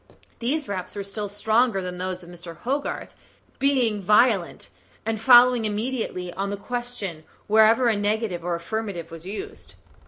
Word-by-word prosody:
These 275 +5 -1
raps 190 -1 -5
were 200 - -3
still 205 +1 -4
stronger 215 +2 +2
than 180 -1 -5
those 185 0 -4
of 170 - -13
Mr. 170 -2 -10
Hogarth, 275 +8 -3 0.5
being 255 -7 +2
violent, 210 -1 +2 0.4
and 220 -1 -2
following 245 -1 +7
immediately 210 -5 -3
on 195 +2 -3
the 205 - -3
question 210 -7 -5 0.2
wherever 220 +3 +5
a 225 - +3
negative 205 -3 -1
or 175 0 -1
affirmative 175 -1 -4
was 165 +2 -10
used. 390 - -8
210 Hz, 150 wpm, -24 LUFS, 185-240 Hz, 0.5 s, following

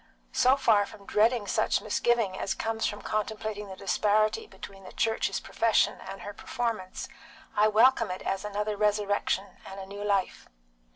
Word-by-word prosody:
So 255 +2 +4
far 210 -6 +3
from 200 - -14
dreading 220 +2 +2
such - - +1
misgiving 230 -6 +1
as 195 - -2
comes 225 0 -1
from 205 - -5
contemplating 215 -1 -3
the 190 - -8
disparity 215 - +1
between 195 - -11
the 185 - -10
Church's 225 0 0
profession 230 -1 +1
and 195 - -8
her 205 - -6
performance, 225 -5 -4 0.5
I 210 +1 +5
welcome 230 +1 +4
it 180 - -5
as 195 +1 -2
another 210 +1 -2
resurrection 205 -2 0
and 195 +1 -9
a 190 - -6
new 200 +1 -7
life." 200 -2 -1
210 Hz, 160 wpm, -28 LUFS, 200-220 Hz, 0.5 s, I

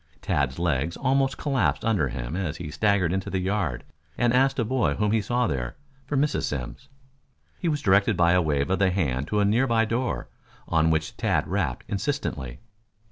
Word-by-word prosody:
Tads 65 -2 -1
legs 85 -1 0
almost 135 0 +1
collapsed 135 -5 0
under 100 -11 +2
him 60 +3 -5
as 85 -4 -3
he 80 -4 -6
staggered 95 0 +2
into 95 +1 -2
the 95 - -1
yard 90 -8 -1 0.3
and 120 0 +2
asked 135 +2 +3
a 120 - +1
boy 110 - +1
whom 105 -1 0
he 110 0 +2
saw 120 +3 0
there, 65 - -3 0.3
for 145 - -1
Mrs. 145 +2 +1
Simms. 75 - -5 0.7
He 170 - 0
was 150 -2 -1
directed 100 +1 +3
by 85 0 +4
a 90 0 +4
wave 75 -1 0
of 95 - +1
the 95 -1 +4
hand 70 -7 -1
to 105 - 0
a - - +3
near 115 +6 +3
by 115 -2 +3
door, 115 - -2 0.4
on 80 -1 +2
which 80 -1 -1
Tad - - 0
rapped - - -2
insistently. 95 - -3
95 Hz, 190 wpm, -25 LUFS, 75-120 Hz, 0.7 s, by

